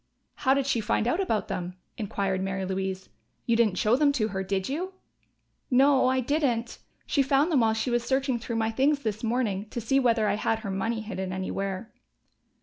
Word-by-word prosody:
"How 265 -1 +2
did 275 -1 +1
she 245 -4 +1
find 220 +1 0
out 320 +9 +1
about 225 - 0
them?" 180 0 -4 0.2
inquired 195 -3 -2
Mary 195 0 -2
Louise. 190 0 -3 0.4
"You 230 - +2
didn't 220 -5 +2
show 215 +5 +3
them 285 +1 +4
to 220 -6 0
her, 190 -1 -3
did 190 0 -1
you?" 355 +8 -3 0.8
"No, 265 0 +5
I 260 0 +2
didn't. 245 -4 -1 0.3
She 285 - +2
found 275 +5 +2
them 290 - +4
while 220 -1 +3
she 240 +3 -1
was 240 0 +1
searching 265 -1 0
through 230 +1 -5
my 225 0 0
things 280 +5 +2
this 215 -1 -3
morning, 220 -4 -1
to 240 - -4
see 255 +4 +2
whether 230 -4 +2
I 205 0 +1
had 225 +1 0
her 200 -4 -4
money 220 +4 -1
hidden 190 -4 -4
anywhere." 190 +2 -4
230 Hz, 200 wpm, -27 LUFS, 195-265 Hz, 0.8 s, No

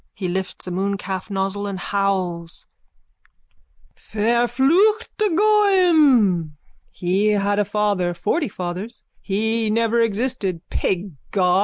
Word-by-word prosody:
He 190 - -4
lifts 185 +1 -4
a 180 - -5
mooncalf 190 0 -3
nozzle 195 +1 -2
and 195 -1 -4
howls.) 185 -3 -2 1.3
Verfluchte 265 - +2 0.3
Goim!_ 320 - +4 0.4
He 185 +4 0
had 205 -1 +1
a 205 - +2
father, 200 -4 0
forty 250 - -1
fathers. 190 +4 -6 0.2
He 220 +2 -1
never 230 +1 +2
existed. 215 -5 -2
Pig 190 +1 -1 0.2
God! 180 -2 +2
205 Hz, 105 wpm, -21 LUFS, 185-235 Hz, 1.3 s, Goim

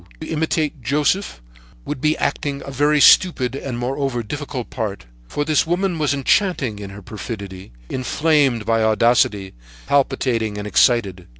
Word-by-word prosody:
To - - -5
imitate 155 -2 -1
Joseph 145 - -1 0.4
would 125 - -5
be 155 0 +1
acting 140 -1 -2
a 140 - -7
very 145 +3 +2
stupid 140 -6 +5
and, 135 -3 -5
moreover, 130 0 -2
difficult 135 +1 -6
part, 105 - -4 0.2
for 145 - -3
this 155 0 +2
woman 175 0 0
was 150 -4 +1
enchanting 140 - +1
in 100 -1 -7
her 100 +1 -11
perfidy, 100 - -8 0.2
inflamed 135 - +1
by 115 0 +1
audacity, 110 -3 +2 0.3
palpitating 125 -6 0
and 105 - -5
excited. 105 -4 +2
130 Hz, 140 wpm, -20 LUFS, 110-150 Hz, 0.4 s, stupid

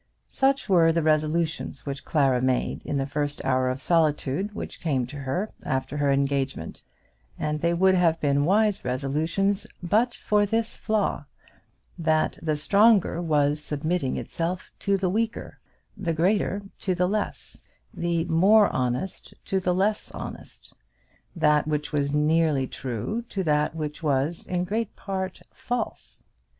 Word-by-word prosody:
Such 275 0 +1
were 170 -4 +5
the 165 0 0
resolutions 155 +1 0
which 140 -1 -5
Clara 135 -5 +2
made 130 -1 0
in 145 - -1
the 135 - 0
first 145 +1 -2
hour 130 -1 +2
of 130 +1 -3
solitude 165 +4 +1
which - - -6
came 135 -7 0
to 135 +5 -10
her 140 +9 -2 0.2
after 130 +2 -2
her 145 -1 +2
engagement; 135 -9 -1 0.6
and 150 0 -2
they 170 0 +2
would 190 +2 +4
have 170 -3 +3
been 145 -1 +2
wise 205 +2 +2
resolutions 155 +10 -1 0.2
but 225 +7 +2
for 210 -1 +2
this 225 +2 -1
flaw 215 -1 -1 0.7
that 160 -1 +1
the 155 -2 0
stronger 200 +2 +4
was 150 -2 +1
submitting 150 -1 -1
itself 175 +2 -4
to 200 -1 +1
the 190 -1 0
weaker, 220 +5 -2 0.4
the 170 -4 -2
greater 195 +4 +1 0.2
to 185 -2 0
the 180 0 +2
less, 210 +2 -3 0.3
the 170 -1 -1
more 195 +6 +5
honest 130 +8 -3
to 190 - 0
the 180 -1 0
less 205 +3 0
honest, - - -9 0.6
that 150 -3 +3
which 150 0 -2
was 140 -1 +1
nearly 150 -2 +2
true 130 - -4
to 195 - -2
that 150 -1 +1
which 150 -1 -4
was 150 +2 0
in 180 -1 -1
great 215 +3 -2
part 190 -1 -4
false. 245 -2 -4
165 Hz, 145 wpm, -25 LUFS, 145-190 Hz, 0.7 s, were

